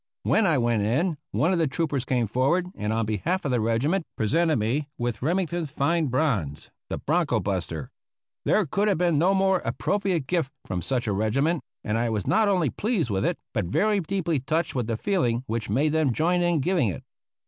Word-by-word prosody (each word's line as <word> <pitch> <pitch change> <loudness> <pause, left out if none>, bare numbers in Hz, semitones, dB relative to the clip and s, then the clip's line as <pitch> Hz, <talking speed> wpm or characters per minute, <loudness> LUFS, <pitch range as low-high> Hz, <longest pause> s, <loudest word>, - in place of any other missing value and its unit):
When 220 -3 +3
I 160 -5 +3
went 120 -3 +1
in, 145 - 0
one 155 - +1
of 175 - +1
the 160 - +2
troopers 140 -2 -1
came 125 -3 +1
forward 135 - +1
and 105 +1 -3
on 115 0 0
behalf 165 - -1
of 140 - 0
the 125 -2 +1
regiment 135 - 0
presented 155 +9 +2
me 130 +7 -1
with 120 -1 -3
Remington's 170 +1 -1
fine 155 +4 +1
bronze, 120 - -1 0.2
"The - - -2
Bronco - - +1
buster." - - -3 0.5
There 215 - +2
could 200 +8 0
have 200 - +2
been 170 -3 +2
no 185 +4 +3
more 190 -1 +3
appropriate 195 -7 -1
gift 165 -2 0 0.2
from 90 -2 -3
such 130 +2 -1
a 105 - 0
regiment, 135 - +1 0.2
and 110 +2 -1
I 120 0 0
was 105 -3 -2
not 220 -1 +3
only 180 - +2
pleased 200 - -1
with 95 -1 0
it, - - 0 0.2
but - - 0
very 205 - +2
deeply 170 -3 -1
touched 155 +4 -1
with 125 -4 -2
the 115 -2 -1
feeling 125 - 0
which 115 -4 -3
made 140 +9 +2
them 155 -5 +2
join 175 +6 +1
in 175 -3 +2
giving 175 -4 +2
it. 90 - -6
150 Hz, 205 wpm, -25 LUFS, 115-175 Hz, 0.5 s, When